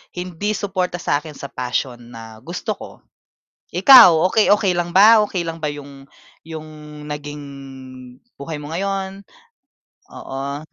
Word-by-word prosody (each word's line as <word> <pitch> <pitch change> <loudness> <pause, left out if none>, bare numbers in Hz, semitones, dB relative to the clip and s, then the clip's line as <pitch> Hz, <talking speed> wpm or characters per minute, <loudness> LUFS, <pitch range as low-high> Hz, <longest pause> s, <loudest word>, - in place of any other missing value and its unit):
hindi 180 +3 -4
suporta 185 -4 -3
sa 145 - 0
akin 155 -3 -10
sa 140 - -8
passion 125 0 -3
na 110 -1 -11
gusto 180 +6 -4
ko. - - -10 0.9
Ikaw, 185 - +8
okey-okey 205 -2 +3
lang 175 0 -3
ba? 215 +4 +7
Okey 185 -3 -3
lang 165 -1 -6
ba 155 - -4
yung, 140 -2 -8 0.4
yung 160 -1 -7 0.5
naging 145 0 -6 1.0
buhay 150 +3 -7
mo 145 - -9
ngayon? 195 +2 -4 0.9
Oo. 140 +1 -6
165 Hz, 130 wpm, -20 LUFS, 145-195 Hz, 1.0 s, Ikaw